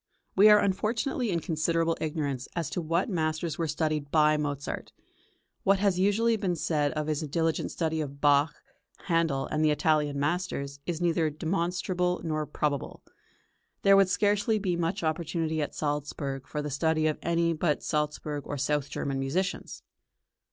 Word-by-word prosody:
We 205 +2 +7
are 210 - +8
unfortunately 220 +5 0
in 170 -3 0
considerable 165 +1 0
ignorance 145 -5 -2
as 165 -3 -2
to 180 - -2
what 165 +3 0
masters 160 -4 -2
were 165 - 0
studied 155 -1 -1
by 155 0 +4
Mozart. 145 -2 -4 0.7
What 195 0 +4
has 195 -2 +1
usually 220 +4 +3
been 190 -4 -1
said 150 -3 0
of 155 -1 -2
his 155 0 -1
diligent 160 +1 -1
study 160 -1 -1
of 140 -1 -6
Bach, 145 +1 +3 0.4
Handel, 165 -6 +1
and 155 0 -1
the 155 - +4
Italian 150 -1 +1
masters, 145 -3 -2
is 175 -1 -2
neither 165 -2 +2
demonstrable 180 +2 -1
nor 155 -2 -2
probable. 145 -1 -2 0.8
There 195 0 +7
would 195 -1 +5
scarcely 205 +3 +2
be 190 -4 -1
much 170 +3 -1
opportunity 160 0 -1
at 145 - -4
Salzburg 145 -2 -3
for 150 - -3
the 150 - -4
study 155 +2 +1
of 155 -1 0
any 170 0 +1
but 155 -1 0
Salzburg 150 -1 -2
or 145 - -3
south 145 +1 0
German 135 -1 -3
musicians. 165 +8 -2
160 Hz, 160 wpm, -28 LUFS, 150-180 Hz, 0.8 s, are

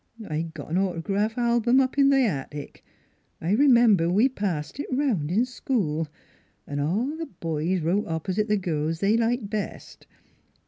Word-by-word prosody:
" 220 - -8
I 160 +2 -3
got 150 0 -8
an 180 - +2
autograph 195 +4 -1
album 240 +1 +3
up 260 -1 +1
in 275 -1 +5
the 270 -1 +4
attic; 145 - -5 0.6
I 170 - -2
r'member 235 - +5
we 215 +8 +4
passed 190 - -3
it 290 - -3
'round 255 - 0
in 215 +8 +2
school, 185 - -2 0.6
'n' 145 0 -4
all 210 - 0
the 325 0 -5
boys 165 +1 -2
wrote 180 +6 0
opp'site 185 +6 -1
the 210 -1 +2
girls 160 -3 -2
they 205 +4 +3
liked 230 -2 0
best. 215 -1 -6
200 Hz, 165 wpm, -25 LUFS, 165-240 Hz, 0.6 s, in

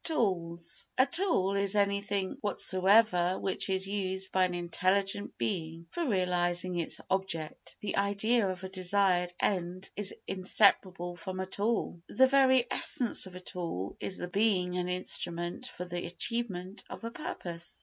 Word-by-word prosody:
Tools 170 - -1
A 260 - +6
tool 275 - +3
is 200 0 +1
anything 200 -1 0
whatsoever 190 -2 +3
which 190 0 -1
is 190 0 +1
used 190 -1 -2
by 185 -1 +4
an 180 -1 -3
intelligent 195 +3 0
being 160 +7 -3
for 340 -3 -2
realising 180 -3 +1
its 165 - -3
object. 190 -5 -3
The 205 - -2
idea 200 +2 +2
of 185 0 -5
a 190 - -5
desired 185 -1 +2
end 185 -1 -1
is 205 -1 +1
inseparable 185 -2 +2
from 185 +2 -6
a 190 - -1
tool. 200 -2 -1
The 260 - +5
very 260 -2 +5
essence 235 -5 +2
of 185 - -12
a - - -6
tool 170 - -5
is 190 - -3
the 180 - -4
being 185 -2 +1
an 180 0 -1
instrument 175 -1 -3
for 180 - -7
the 175 0 -4
achievement 190 0 -3
of - - -8
a 230 - -4
purpose. 170 - -7
190 Hz, 150 wpm, -31 LUFS, 175-205 Hz, -, A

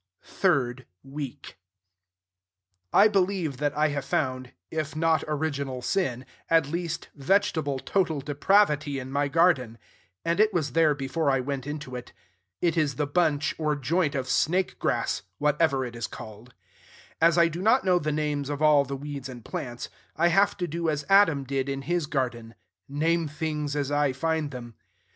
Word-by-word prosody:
THIRD 130 -8 0 0.2
WEEK 140 -5 -8 1.3
I 205 - +7
believe 185 -8 0
that 145 +1 -1
I 155 0 +3
have 145 -2 -3
found, 130 -2 -2 0.2
if 155 -1 -3
not 160 -1 +2
original 140 -4 -2
sin, 130 -7 -1 0.2
at 165 -3 +4
least 165 0 -4
vegetable 155 -2 +1
total 160 +1 0
depravity 150 0 +2
in 130 0 -6
my 145 +1 +1
garden; 140 -7 +2 0.5
and 170 +3 0
it 215 0 +5
was 150 -6 0
there 155 0 +3
before 140 +3 -1
I 135 -1 +2
went 135 +1 -4
into 145 -3 -6
it. 125 - -8 0.5
It 170 -1 +2
is 150 -3 +1
the 150 - 0
bunch, 155 -1 +1
or 150 -1 +1
joint, 150 +2 0
or 135 - 0
snakegrass, 175 +8 0 0.2
whatever 150 -2 +2
it 120 -1 -8
is 115 -2 -3
called. 110 +3 -11 0.7
As 165 +1 +5
I 170 0 +6
do 170 +2 -5
not 225 +3 +3
know 180 -1 +4
the 155 -2 -2
names 145 -2 -1
of 145 -1 -3
all 150 -2 +5
the 140 +1 -5
weeds 140 -1 -6
and 120 -3 -10
plants, 120 -2 -5 0.3
I 170 +2 +3
have 195 +4 +3
to 180 -2 -2
do 165 +1 -2
as 150 -1 -2
Adam 195 -8 +5
did 135 0 -2
in 135 0 -3
his 175 0 -1
garden, 120 -6 -3 0.3
name 165 +3 +1
things 150 -1 -3
as 145 -1 -1
I 145 -2 +2
find 160 +1 -1
them. 120 -3 -8
150 Hz, 165 wpm, -26 LUFS, 135-165 Hz, 1.3 s, I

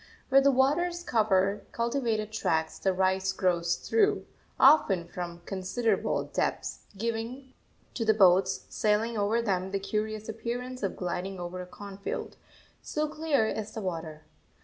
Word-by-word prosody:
Where 275 0 +6
the 280 - +5
waters 335 +7 +2
cover 205 - +2
cultivated 235 -3 -1
tracts 160 -7 -1
the 190 - +2
rice 190 +1 +1
grows 175 -2 +1
through, 430 -3 +1 0.3
often 200 - +5
from 175 -1 -6
considerable 195 +5 0
depths, - - -2 0.2
giving 230 +4 -4 0.4
to 235 - -2
the 220 -1 +3
boats 190 -1 +4
sailing 220 +2 +1
over 215 +3 +1
them 190 -3 0
the 195 0 -1
curious 215 +2 -3
appearance 245 +3 -4
of 195 -3 -2
gliding 185 +1 -3
over 175 +1 -5
a 180 - -8
cornfield, 200 +1 -6 0.5
so 305 0 -2
clear 305 -5 +1
is 220 0 -4
the 220 - -4
water. 160 -4 -5
210 Hz, 140 wpm, -29 LUFS, 185-235 Hz, 0.5 s, Where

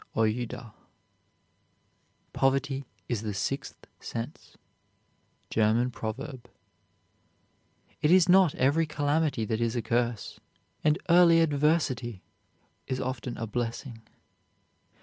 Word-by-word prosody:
OUIDA. 110 +1 -1 1.6
Poverty 135 0 +1 0.2
is 115 -4 -2
the 105 -2 -4
sixth 135 +8 -4
sense. 115 +6 -7 0.9
GERMAN 115 +3 +2
PROVERB. 125 +4 -6 1.5
It 150 - +3
is 185 0 +6
not 185 -3 +5
every 145 +5 +2
calamity 145 -4 0
that 110 0 -2
is 115 0 0
a 120 - 0
curse, 120 -1 -1 0.4
and 150 0 +3
early 170 -1 +6
adversity 145 - +1 0.6
is 130 - -2
often 125 -1 -4
a 115 - -3
blessing. 115 +1 -4
130 Hz, 95 wpm, -28 LUFS, 115-150 Hz, 1.6 s, is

